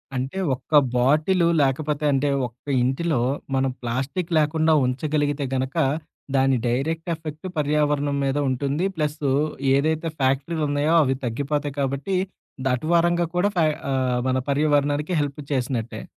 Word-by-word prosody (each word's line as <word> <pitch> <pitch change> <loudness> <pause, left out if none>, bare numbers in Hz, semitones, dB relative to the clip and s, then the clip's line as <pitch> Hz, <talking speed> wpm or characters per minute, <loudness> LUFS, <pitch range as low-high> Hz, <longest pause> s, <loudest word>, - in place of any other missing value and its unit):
అంటే 135 +8 -3 0.2
ఒక్క 150 +4 +1 0.2
బాటిలు 155 +8 +3
లేకపోతే, 145 +2 0
అంటే 140 +1 +1 0.2
ఒక్క 120 +1 -23 0.2
ఇంటిలో 135 +3 0 0.4
మనం 135 0 +1
ప్లాస్టిక్కు 135 +9 -3
లేకుండా 160 +1 +2
ఉంచగలిగితే 145 +2 -1
గనక, 130 +1 -2 0.6
దాని 135 -1 +3
డైరెక్ట్ 160 +8 -1
ఎఫెక్ట్ 155 +2 -7
పర్యావరణం 145 -1 +1
మీద 135 +1 0
ఉంటుంది. 140 +7 -1
ప్లసు 150 -2 -1 0.4
ఏదైతే 160 +3 0
ఫ్యాక్టరీలున్నాయో 145 +2 +1
అవి 135 -1 +1
తగ్గిపోతాయి 145 +4 -2
కాబట్టి, 140 +7 -1 0.5
దాటు 125 +3 0
వరంగా 175 0 +3
కూడా 195 +3 +2
ఫా 170 - +4 0.3
ఆహ్, 130 -2 +1
మన 130 0 +1
పర్యావరణానికి 145 +2 +1
హెల్ప్ 145 0 -4
చేసినట్టే. 125 -4 -2
145 Hz, 120 wpm, -23 LUFS, 135-155 Hz, 0.6 s, ఫా